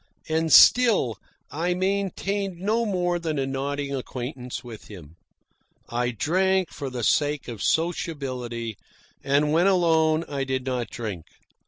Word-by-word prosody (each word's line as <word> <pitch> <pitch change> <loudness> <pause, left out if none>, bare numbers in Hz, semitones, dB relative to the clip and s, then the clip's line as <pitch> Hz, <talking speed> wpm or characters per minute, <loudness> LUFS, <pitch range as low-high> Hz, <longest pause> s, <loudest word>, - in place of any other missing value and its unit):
And 160 0 0
still 205 - +6 0.3
I 170 +5 -1
maintained 195 0 -2
no 220 +4 0
more 175 -3 0
than 160 -3 -3
a 135 - 0
nodding 140 +1 -3
acquaintance 125 -1 -5
with 115 -3 -10
him. 85 -6 -12 0.7
I 120 +1 0
drank 185 - +1
for 140 -3 -5
the 125 -2 -5
sake 145 +3 +1
of 115 -4 -7
sociability, 130 - -2 0.5
and 145 +2 +2
when 170 +4 +4
alone 165 -4 +3
I 140 -1 -2
did 130 -1 -2
not 125 -3 -2
drink. 105 -9 -6
145 Hz, 135 wpm, -25 LUFS, 125-175 Hz, 0.7 s, still